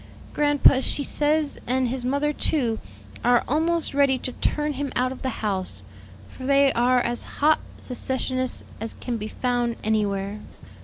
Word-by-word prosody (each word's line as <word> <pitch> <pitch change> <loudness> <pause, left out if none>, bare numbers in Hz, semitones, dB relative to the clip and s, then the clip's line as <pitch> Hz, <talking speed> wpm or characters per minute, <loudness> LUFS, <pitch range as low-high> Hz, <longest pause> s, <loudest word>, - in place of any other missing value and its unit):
Grandpa, 290 -2 +5
she 285 +2 -1
says, 300 +1 0
and 255 0 +1
his 250 +1 -3
mother, 285 +4 0
too, 240 -8 +1 0.4
are 245 0 +4
almost 325 +3 +2
ready 275 -2 +3
to 255 - -4
turn 300 +3 -1
him 280 0 -3
out 255 +1 +1
of 260 - -8
the 260 - -1 0.2
house; 190 -3 0 0.4
for 260 - -12
they 275 0 +4
are 250 +1 +3
as 240 0 -2 0.2
hot 310 +2 +4 0.2
secessionists 255 0 -2 0.2
as 225 +1 -5
can 245 -2 -4
be 215 -1 -5
found 240 0 -1
anywhere. 205 -1 -1
255 Hz, 155 wpm, -24 LUFS, 240-285 Hz, 0.4 s, Grandpa